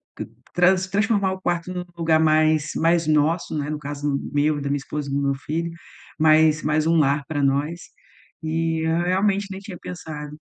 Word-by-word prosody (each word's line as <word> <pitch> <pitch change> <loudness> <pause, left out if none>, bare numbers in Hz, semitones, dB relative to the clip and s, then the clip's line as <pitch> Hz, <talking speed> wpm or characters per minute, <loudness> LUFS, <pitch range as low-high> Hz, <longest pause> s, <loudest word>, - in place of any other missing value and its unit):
tran - - -6 0.3
trans 185 +1 +3
transformar 200 -1 +1
o 190 - -9
quarto 175 0 -2
no 180 - -4
lugar 160 -1 +3
mais 155 -1 +3
mais 165 0 +2
nosso, 155 +2 +1
né. 145 0 -3
No 155 - -2
caso 145 -1 -2 0.2
meu, 145 0 +1
da 140 - -3
minha 145 - +1
esposa 145 0 -5
e - - -4
do 140 - 0
meu 140 -1 +1
filho, 160 +4 -3 0.5
mais 155 0 +4
mais 155 +1 +1
um 165 - +3
lar 140 -1 +2
para 145 -2 -1
nós 145 +5 0 0.6
e 160 0 -1
eu 165 +1 +1
realmente 195 +2 +1
nem 190 - -6
tinha 195 -3 -9
pensado. 150 -4 -8
155 Hz, 190 wpm, -23 LUFS, 150-175 Hz, 0.6 s, mais